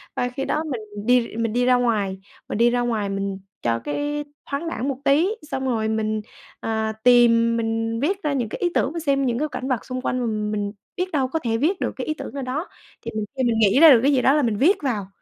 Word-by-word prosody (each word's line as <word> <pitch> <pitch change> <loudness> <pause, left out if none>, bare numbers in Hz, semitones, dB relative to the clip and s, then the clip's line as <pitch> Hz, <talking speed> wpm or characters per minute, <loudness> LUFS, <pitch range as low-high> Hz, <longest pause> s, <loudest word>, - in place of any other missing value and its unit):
Và 245 - 0
khi 270 +2 -4
đó 305 - 0
mình 265 -8 -4 0.2
đi 250 +1 +5
r 225 - -8
mình 230 -1 -1
đi 245 0 +2
ra 255 - +5
ngoài, 215 -6 0 0.3
mình - - -2
đi 235 +2 +5
ra 245 0 +1
ngoài 220 -4 -1
mình 195 0 -3 0.2
cho 115 -1 0
cái 290 - -2 0.3
thoáng 285 +4 -3
đãng 260 -3 -3
một 275 - -2
tí, 300 +6 +4 0.2
xong 265 0 -2
rồi 220 -3 0
mình, 215 -1 -1 0.4
à, 220 -1 -2
tìm, 230 -1 +5
mình 225 0 -1
viết 380 +6 -1
ra 295 -2 0
những 240 -5 -1
cái - - -6
ý 355 - +1
tưởng 270 - +1
và 335 - -3
xem 275 -3 +1
những 240 -2 0
cảnh 260 - -4
vật 255 -4 -1
xung 255 0 -4
quanh, 255 - -1 0.3
m - - -3
mình 205 -1 -2 0.3
biết 365 0 -2
đâu 270 -4 +1
có 320 +5 -2
thể 230 -5 -1
viết 340 +10 +1
được - - 0
cái 260 - -5
ý 310 - 0
tưởng 310 - -8
ở 280 - -4
đó. 270 +8 -3 0.3
Thì - - -6
mình 215 - -1
thì 260 - +1
mình 230 -2 +1
nghĩ 210 +4 +4
ra 325 0 +10
được 245 - +7
cái 280 - +4
gì 255 - +3
đó 270 - +4
là 300 - +3
mình 230 -6 0
viết 360 - +4
vào 215 -8 -1
245 Hz, 265 wpm, -23 LUFS, 225-280 Hz, 0.4 s, ra